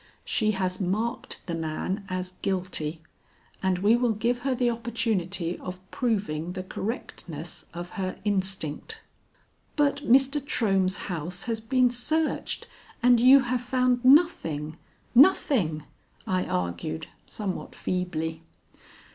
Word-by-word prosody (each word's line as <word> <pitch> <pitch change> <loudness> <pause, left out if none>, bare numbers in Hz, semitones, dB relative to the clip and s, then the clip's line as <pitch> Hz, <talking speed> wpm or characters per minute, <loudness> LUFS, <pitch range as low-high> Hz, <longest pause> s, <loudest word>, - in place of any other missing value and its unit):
She 215 -2 +1
has 185 0 -1
marked 220 +7 -2
the 175 - -4
man 165 +5 -3
as 185 0 -3
guilty, 175 -4 -2 0.6
and 190 -1 +1
we 205 +5 +4
will 240 -1 +2
give 235 +3 0
her 260 +1 0
the 245 -1 +2
opportunity 200 -7 -1
of 185 0 -6
proving 195 - -1
the 185 0 -4
correctness 175 - -5
of 175 +1 -7
her 185 0 -3
instinct." 190 - -1 0.7
"But 285 -2 +2
Mr. 275 +1 +3
Trohm's 195 -9 +1
house 175 0 -3
has 230 -2 -2
been 250 +2 +3
searched, 310 +6 -1 0.4
and 245 -1 +6
you 260 +3 +8
have 250 -1 -1
found 250 0 +1
nothing 165 - +4 0.4
nothing," 240 - +4 0.4
I 185 -1 0
argued 85 -3 -2 0.2
somewhat 200 -4 -5
feebly. 160 -3 -2
195 Hz, 120 wpm, -27 LUFS, 180-245 Hz, 0.7 s, you